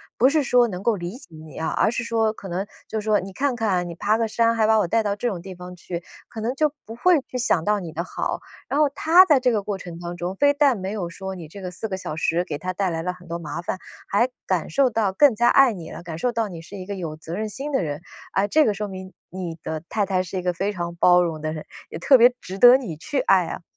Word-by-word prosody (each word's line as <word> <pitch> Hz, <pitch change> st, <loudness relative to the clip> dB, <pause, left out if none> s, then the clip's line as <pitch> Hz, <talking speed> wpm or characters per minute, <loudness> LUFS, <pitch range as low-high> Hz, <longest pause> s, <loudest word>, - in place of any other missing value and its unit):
不 260 Hz, +3 st, +5 dB
是 305 Hz, 0 st, +2 dB
说 245 Hz, -3 st, +3 dB
能 180 Hz, -1 st, -5 dB
够 230 Hz, -3 st, +2 dB
理 180 Hz, +5 st, -6 dB
解 -, -, -14 dB
你 155 Hz, 0 st, -12 dB
啊， 160 Hz, -, -2 dB
而 220 Hz, -, +2 dB
是 240 Hz, -, -2 dB
说 225 Hz, -2 st, +1 dB
可 200 Hz, -3 st, -10 dB
能 185 Hz, +2 st, -2 dB, 0.2 s
就 220 Hz, -, -3 dB
是 -, -, -11 dB
说： 215 Hz, -1 st, +3 dB
“你 190 Hz, 0 st, -8 dB
看 265 Hz, 0 st, 0 dB
看 185 Hz, -6 st, 0 dB
你 170 Hz, -, -5 dB
爬 215 Hz, +5 st, +1 dB
个 230 Hz, -, +1 dB
山， 230 Hz, +1 st, +2 dB
还 220 Hz, -, +3 dB
把 220 Hz, 0 st, +4 dB
我 180 Hz, -, +1 dB
带 225 Hz, +5 st, +2 dB
到 205 Hz, -1 st, -1 dB
这 245 Hz, -, -1 dB
种 190 Hz, -7 st, -3 dB
地 190 Hz, 0 st, -8 dB
方 180 Hz, 0 st, -10 dB
去。” 170 Hz, 0 st, -6 dB, 0.3 s
可 225 Hz, -, -8 dB
能 235 Hz, +4 st, -2 dB
就 300 Hz, 0 st, +2 dB
不 225 Hz, -, -8 dB
会 350 Hz, +4 st, +4 dB
去 250 Hz, -, -5 dB
想 185 Hz, -9 st, +1 dB
到 210 Hz, -1 st, +1 dB
你 165 Hz, -3 st, -7 dB
的 170 Hz, +3 st, -4 dB
好， -, -, -3 dB, 0.3 s
然 285 Hz, -, 0 dB
后 300 Hz, -, +5 dB
她 325 Hz, +6 st, +6 dB
在 295 Hz, -7 st, +4 dB
这 250 Hz, -, +3 dB
个 215 Hz, -3 st, +1 dB
过 200 Hz, 0 st, -3 dB
程 175 Hz, -2 st, -9 dB
当 175 Hz, 0 st, -6 dB
中， 175 Hz, +2 st, -3 dB
非 285 Hz, 0 st, +5 dB
但 285 Hz, -4 st, +3 dB
没 190 Hz, 0 st, -4 dB
有 180 Hz, -5 st, -3 dB
说 190 Hz, +2 st, -6 dB
你 165 Hz, -4 st, -9 dB
这 200 Hz, +3 st, -10 dB
个 180 Hz, -1 st, -5 dB
4 220 Hz, +5 st, -5 dB
个 190 Hz, -, -3 dB
小 170 Hz, -, -5 dB
时 165 Hz, +2 st, 0 dB
给 145 Hz, -, -4 dB
她 185 Hz, +3 st, -3 dB
带 190 Hz, +1 st, -1 dB
来 165 Hz, -1 st, -2 dB
了 180 Hz, -, -1 dB
很 180 Hz, -1 st, -14 dB
多 170 Hz, +1 st, -3 dB
麻 170 Hz, +1 st, -5 dB
烦， 185 Hz, +2 st, -4 dB, 0.3 s
还 235 Hz, +6 st, +2 dB, 0.2 s
感 180 Hz, -4 st, 0 dB
受 275 Hz, -2 st, +3 dB
到 215 Hz, -4 st, 0 dB
更 265 Hz, +3 st, +5 dB
加 240 Hz, +2 st, +3 dB
爱 270 Hz, -4 st, +6 dB
你 170 Hz, -4 st, -9 dB
了， 170 Hz, -, -8 dB
感 165 Hz, -2 st, -6 dB
受 245 Hz, +8 st, 0 dB
到 230 Hz, -2 st, -1 dB
你 170 Hz, -4 st, -8 dB
是 200 Hz, +4 st, -10 dB
一 185 Hz, -, -7 dB
个 200 Hz, 0 st, -5 dB
有 160 Hz, -4 st, -5 dB
责 160 Hz, +2 st, -7 dB
任 215 Hz, 0 st, -3 dB
心 280 Hz, +7 st, -5 dB
的 195 Hz, -, +2 dB
人。 145 Hz, -1 st, -3 dB, 0.4 s
诶， 195 Hz, +1 st, +2 dB
这 310 Hz, +9 st, +4 dB
个 210 Hz, -, +2 dB
说 210 Hz, +1 st, -4 dB
明 190 Hz, 0 st, -9 dB, 0.2 s
你 175 Hz, -3 st, -6 dB
的 155 Hz, -1 st, -4 dB
太 210 Hz, -2 st, 0 dB
太 185 Hz, -1 st, 0 dB
是 185 Hz, +1 st, -6 dB
一 -, -, -1 dB
个 180 Hz, 0 st, 0 dB
非 195 Hz, +4 st, -1 dB
常 170 Hz, -3 st, -5 dB
包 180 Hz, +1 st, +5 dB
容 160 Hz, -3 st, -2 dB
的 155 Hz, -, -2 dB
人， 155 Hz, -1 st, -6 dB, 0.2 s
也 160 Hz, -, -7 dB
特 265 Hz, +8 st, +6 dB
别 245 Hz, +1 st, +6 dB
值 190 Hz, +2 st, -8 dB
得 245 Hz, +4 st, +9 dB
你 225 Hz, -, -6 dB
去 265 Hz, -, -3 dB
爱 190 Hz, -8 st, +3 dB
啊。 -, -, -6 dB
195 Hz, 315 characters per minute, -23 LUFS, 175-230 Hz, 0.4 s, 得